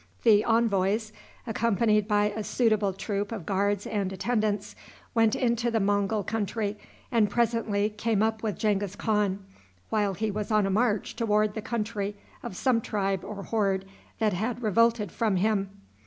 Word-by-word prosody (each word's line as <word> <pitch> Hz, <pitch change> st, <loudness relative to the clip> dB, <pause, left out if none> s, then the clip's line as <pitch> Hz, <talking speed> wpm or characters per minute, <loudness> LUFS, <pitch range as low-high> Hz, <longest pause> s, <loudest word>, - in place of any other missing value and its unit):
The 210 Hz, -1 st, +6 dB
envoys, 215 Hz, -1 st, +1 dB, 0.3 s
accompanied 220 Hz, -2 st, +1 dB
by 210 Hz, -1 st, +2 dB
a 220 Hz, -, -3 dB
suitable 215 Hz, -4 st, +2 dB
troop 200 Hz, +2 st, -3 dB
of 210 Hz, -8 st, -5 dB
guards 200 Hz, +1 st, 0 dB
and 200 Hz, -3 st, -2 dB
attendants, 210 Hz, +1 st, -1 dB, 0.4 s
went 225 Hz, -2 st, +3 dB
into 235 Hz, -1 st, +1 dB
the 230 Hz, -1 st, +1 dB
Mongul 205 Hz, +1 st, +1 dB
country 215 Hz, -1 st, -2 dB, 0.4 s
and 220 Hz, -3 st, +3 dB
presently 220 Hz, -2 st, +1 dB
came 215 Hz, 0 st, 0 dB
up 220 Hz, 0 st, 0 dB
with 210 Hz, -5 st, -2 dB
Genghis 205 Hz, -2 st, 0 dB
Khan, 205 Hz, -3 st, 0 dB, 0.5 s
while 205 Hz, -3 st, +1 dB
he 215 Hz, +3 st, -1 dB
was 210 Hz, 0 st, -4 dB
on 215 Hz, -2 st, +3 dB
a 195 Hz, -, 0 dB
march 210 Hz, 0 st, +1 dB
toward 215 Hz, -2 st, +1 dB
the 220 Hz, -, -4 dB
country 210 Hz, -3 st, -3 dB, 0.3 s
of 185 Hz, -, -7 dB
some 250 Hz, -4 st, +2 dB
tribe 195 Hz, -3 st, -1 dB
or 200 Hz, -1 st, -6 dB
horde 195 Hz, -4 st, 0 dB, 0.3 s
that 215 Hz, -3 st, +1 dB
had 225 Hz, +6 st, -2 dB
revolted 225 Hz, -1 st, +2 dB
from 220 Hz, -4 st, 0 dB
him. 195 Hz, 0 st, +1 dB
210 Hz, 155 wpm, -27 LUFS, 200-225 Hz, 0.5 s, The